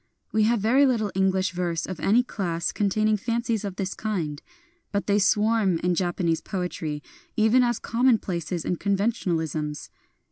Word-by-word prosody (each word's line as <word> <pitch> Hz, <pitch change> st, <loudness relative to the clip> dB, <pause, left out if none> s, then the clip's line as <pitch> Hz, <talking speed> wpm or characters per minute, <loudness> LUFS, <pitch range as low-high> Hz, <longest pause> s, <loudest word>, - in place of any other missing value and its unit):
We 215 Hz, 0 st, +3 dB
have 235 Hz, +1 st, +2 dB
very 255 Hz, +7 st, +4 dB
little 220 Hz, -6 st, 0 dB
English 190 Hz, 0 st, +1 dB
verse 175 Hz, -2 st, -2 dB
of 185 Hz, -3 st, -6 dB
any 230 Hz, +5 st, +3 dB
class 175 Hz, -8 st, -2 dB
con 205 Hz, -1 st, 0 dB
taining 215 Hz, +1 st, +1 dB
fancies 230 Hz, 0 st, -1 dB
of 200 Hz, -3 st, -4 dB
this 190 Hz, -1 st, -3 dB
kind; 170 Hz, -9 st, -3 dB, 0.5 s
but 200 Hz, -1 st, -1 dB
they 205 Hz, 0 st, +2 dB
swarm 210 Hz, -2 st, +3 dB
in 180 Hz, 0 st, +2 dB
Japanese 175 Hz, -2 st, 0 dB
poetry 165 Hz, -6 st, -4 dB, 0.3 s
even 220 Hz, +4 st, +5 dB
as 240 Hz, -2 st, +1 dB
commonplaces 200 Hz, -, 0 dB
and 180 Hz, -, -1 dB
conventionalisms. 165 Hz, -7 st, -1 dB
195 Hz, 150 wpm, -25 LUFS, 175-220 Hz, 0.5 s, even